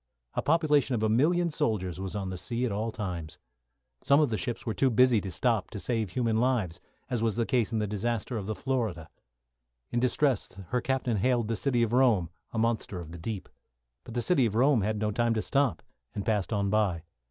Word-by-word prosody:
A - - 0
population 150 -4 +2
of 110 - -1
a 110 - +2
million 165 +9 +3
sailors 95 - -1
was 95 +1 -5
on 95 -2 -3
the - - -4
sea 120 +7 -1
at 120 - -1
all 110 +3 -1
times. 90 -8 -5 0.7
Some 140 +1 +5
of 150 -3 +3
the 110 - 0
ships 120 0 -3
were 110 - -1
too 135 - +2
busy 125 -2 +4
to 95 - -5
stop 110 -1 0
to 105 - -6
save 110 0 -1
human 115 +3 0
lives, 110 -9 0 0.3
as 120 -3 0
was 115 -2 +1
the 115 0 +1
case 120 -3 +1
in 115 - 0
the 105 - 0
disaster 110 +3 -2
of 100 -3 -4
the 110 - -2
"Florida." 110 -13 -2 0.8
In 120 - +1
distress, 130 -1 +1 0.2
her 125 0 0
captain 130 -4 0
hailed 120 +1 +1
"The 115 - 0
City 120 0 +1
of 115 0 -1
Rome," 115 -10 +3 0.2
a - - -5
monster 110 -4 0
of 80 -2 -8
the 85 - -8
deep. 100 +2 -5 0.6
But 115 - -10
"The 120 - 0
City 135 -7 +3
of 110 - -4
Rome" 130 0 +4
had 105 +2 -1
no 105 0 0
time 115 +2 +1
to 110 - 0
stop, 135 - +1 0.3
and 100 - -3
passed 105 -3 0
on 100 -2 0
by. 100 -6 +1
115 Hz, 220 wpm, -29 LUFS, 100-125 Hz, 0.8 s, Some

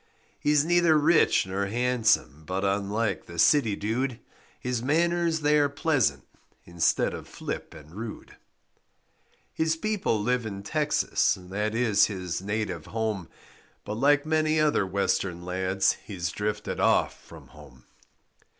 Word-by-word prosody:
He - - -1
is 150 0 +3
neither 175 -2 +4
rich 155 - +4
nor 95 +1 -2
handsome, 115 - +1
But, 95 +2 -2
unlike 100 +1 -1
the 85 - -10
city 115 - +4
dude, 120 +5 -2 0.4
His 125 -2 -2
manners 165 +3 +1
they 150 0 +3
are 145 -1 +3
pleasant 135 - 0 0.4
Instead 85 -3 +1
of - - -8
flip - - -6
and 75 -1 -13
rude. 110 +2 -8 1.2
His 160 0 0
people 195 - -1
live 125 +3 0
in 100 -3 -6
Texas, 150 +7 +1
That 105 +4 -3
is 115 -4 +3
his 90 -4 -4
native 100 -5 -3
home, 110 -6 -3 0.6
But 105 - -4
like 145 +6 +3
many 155 0 +1
other 150 -10 +2
Western 95 -2 -1
lads 95 +1 +1
He 100 - -8
drifted 105 +5 -3
off - - +2
from - - -14
home. 65 -1 -16
110 Hz, 135 wpm, -27 LUFS, 95-145 Hz, 1.2 s, neither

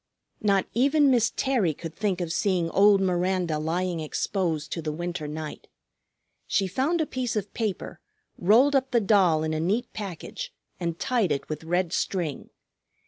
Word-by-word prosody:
Not 200 -2 +2
even 280 +4 +4
Miss 235 -3 +3
Terry 230 - +1
could 165 0 -7
think 195 -3 -1
of 170 -2 -2
seeing 180 -5 +1
old 200 0 +5
Miranda 180 -3 0
lying 170 +2 -1
exposed 160 0 -2
to 165 - -3
the 155 -1 -3
winter 175 0 -4
night. 155 0 -6 0.8
She 195 - +1
found 275 - 0
a - - +1
piece 255 -5 -3
of 210 -1 -3
paper, 215 -5 -3 0.4
rolled 240 +10 +4
up 265 -1 +2
the 240 - +3
doll 190 -7 +3
in 155 0 -1
a 155 - -1
neat 205 +9 -1
package, 210 - -6 0.3
and 170 -2 -2
tied 230 -8 +1
it 140 - -2
with 155 0 -4
red 175 +1 0
string. 170 -7 -2
185 Hz, 165 wpm, -26 LUFS, 165-220 Hz, 0.8 s, old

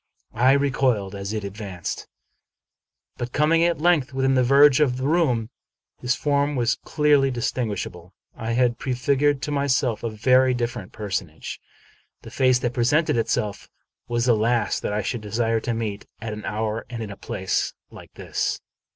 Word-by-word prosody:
I 125 +4 +4
recoiled 130 -8 +1
as 100 0 -5
it 110 -1 -3
advanced. 100 -3 -6 1.1
By 120 - -2
coming 155 +6 +2
at 170 -2 +1
length 155 -5 +2
within 135 0 +2
the 130 - +3
verge 140 +2 +6
of 130 -5 +2
the 130 +1 -2
room, 135 -9 +1 0.5
his 125 +1 0
form 145 0 0
was 120 -1 +1
clearly 145 -3 +3
distinguishable. 105 -8 -3 0.2
I 115 0 -3
had 120 -1 +2
prefigured 135 +2 +1
to 150 - -2
my 140 -1 0
self 125 -4 +1
a 115 - -2
very 130 +4 +3
different 120 -5 -4
personage. 95 -7 -5 0.6
The - - -10
face 130 -1 +3
that 120 - -1
presented 135 +7 +2
itself 110 -3 -1 0.4
was 120 0 0
the 120 -2 +4
last 110 -1 +1
that - - -2
I 105 0 -1
should 120 +4 -3
desire 115 +2 0
to 120 - -2
meet 105 -3 -4
at 110 -1 -5
an 105 0 -7
hour 110 +1 -2
and 115 -2 -5
in 105 - -7
a - - -7
place 95 -1 -2 0.2
Hke - - -12
this. - - -2
120 Hz, 170 wpm, -24 LUFS, 110-135 Hz, 1.1 s, verge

